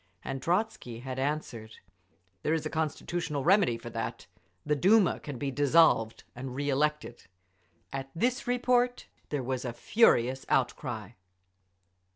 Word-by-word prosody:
And 135 -1 -4
Trotzky 170 - -1
had 130 0 -5
answered, 130 -6 -3 0.7
"There 155 - +1
is 155 -1 -3
a 155 - -3
constitutional 160 -1 -2
remedy 180 - +4
for 120 - -9
that. 115 +1 -4 0.4
The 150 0 +2
Duma 195 +5 +4
can 145 -4 -7
be 140 +2 -2
dissolved 145 -5 +3
and 125 +1 -6
re 145 +1 -2
elected…." 150 -2 -1 0.7
At 135 0 -4
this 245 +8 0
report 245 0 +1 0.2
there 145 -3 -2
was 130 0 -2
a 120 -2 -4
furious 130 - +3
outcry. 110 -5 -1
145 Hz, 135 wpm, -29 LUFS, 125-170 Hz, 0.7 s, remedy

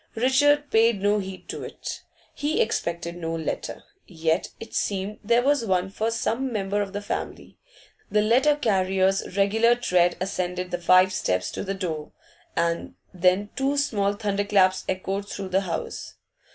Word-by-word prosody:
Richard 290 +4 +3
paid 225 -1 +4
no 205 +2 +2
heed 190 -1 -7
to - - -5
it; - - -7 0.3
he 310 +8 -1
expected 170 - -1
no 165 -1 -3
letter. 160 -1 -4 0.2
Yet 160 0 -1
it 225 - -10
seemed 200 +1 -2
there 235 +3 +3
was 285 -2 +2
one 190 -2 0
for 220 +3 -1
some 230 +3 -1
member 205 -1 -1
of 200 -1 -3
the 205 0 -4
family; - - -5 0.5
the 210 0 +2
letter 260 +7 +4
carrier's 190 -5 +1
regular 225 +4 +4
tread 180 -7 +2
ascended 180 -1 -3
the 175 0 -3
five 185 +2 +5
steps 90 - -1
to - - -4
the 195 0 -3
door, 160 -6 -4 0.4
and 170 0 -1 0.2
then 185 +3 +2
two 275 +1 0
small 205 -8 +1
thunderclaps 200 -2 +1
echoed 195 +2 -2
through 195 -2 -5
the 190 +1 +2
house. 185 -3 -5
195 Hz, 155 wpm, -25 LUFS, 185-225 Hz, 0.5 s, five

